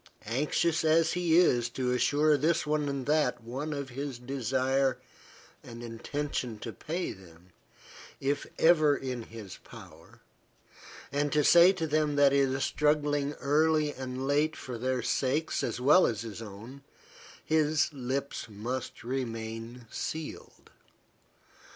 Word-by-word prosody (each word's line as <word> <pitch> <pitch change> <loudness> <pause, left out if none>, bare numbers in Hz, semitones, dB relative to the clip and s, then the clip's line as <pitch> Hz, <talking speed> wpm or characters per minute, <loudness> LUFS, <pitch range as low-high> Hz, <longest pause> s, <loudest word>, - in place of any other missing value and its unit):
Anxious 150 +8 0
as 160 +1 +3
he 170 -2 +2
is 120 -9 +4
to 125 +1 -2
assure 150 +4 +3
this 155 +4 +1
one 150 -1 0
and 140 -2 -3
that 145 -6 +1
one 135 +7 -5
of 140 -2 -4
his 135 0 -5
desire 130 +1 0 0.7
and 120 0 -10
intention 120 0 -4
to 115 - -6
pay 175 +3 -4
them, 90 -1 -15 0.7
if 140 +1 -1
ever 155 -3 +5
in 130 -2 -4
his 110 -4 -10
power, - - -15 0.9
and 145 +1 0
to 150 -1 +3
say 175 +5 +7
to 165 -4 -2
them 150 -1 +1
that 145 -1 +5
he 140 - +3
is 135 0 +1
struggling 145 0 +1
early 150 +1 +2
and 130 0 -5
late 150 +2 +2
for 125 -3 -7
their 130 0 -1
sakes 140 +6 0
as 115 - -2
well 150 +9 +5
as 115 -2 -2
his 115 -1 -7
own, 115 +6 -10 0.6
his 155 0 +2
lips 135 +1 -3
must 120 +6 -5
remain 115 -1 -5
sealed. 160 -1 -6
140 Hz, 135 wpm, -29 LUFS, 120-150 Hz, 0.9 s, say